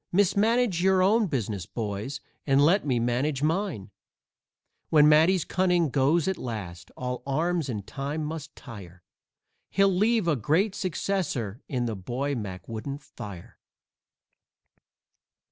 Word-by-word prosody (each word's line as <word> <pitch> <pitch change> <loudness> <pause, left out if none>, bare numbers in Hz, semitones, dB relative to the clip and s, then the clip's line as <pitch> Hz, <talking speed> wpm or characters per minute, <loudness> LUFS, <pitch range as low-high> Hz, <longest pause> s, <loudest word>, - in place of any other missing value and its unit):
Mismanage 205 +1 +2
your 190 0 +4
own 215 +3 +3
business, 110 - -3
boys, 110 +5 -4 0.3
and 140 +1 +5
let 180 +1 +3
me 125 -3 +2
manage 130 +4 0
mine!" 160 - -1 1.0
When 150 -1 +6
Matty's 160 +4 +5
cunning 180 -3 +2
goes 145 +5 +2
at 190 - -1
last 90 -7 -6
all 125 0 -4
arms 160 +2 0
in 105 -5 -3
time 145 +7 -4
must 150 -1 -6
tire 95 -8 -11 0.7
He'll 195 0 +3
leave 215 0 +2
a 160 - +3
great 165 - +1
successor 175 - -2
in 125 -4 -1
the 115 -2 -2
boy 125 +9 -3
Mac 100 -7 -6
wouldn't 135 +6 -6
fire. 100 -9 -10
145 Hz, 130 wpm, -27 LUFS, 115-180 Hz, 1.0 s, When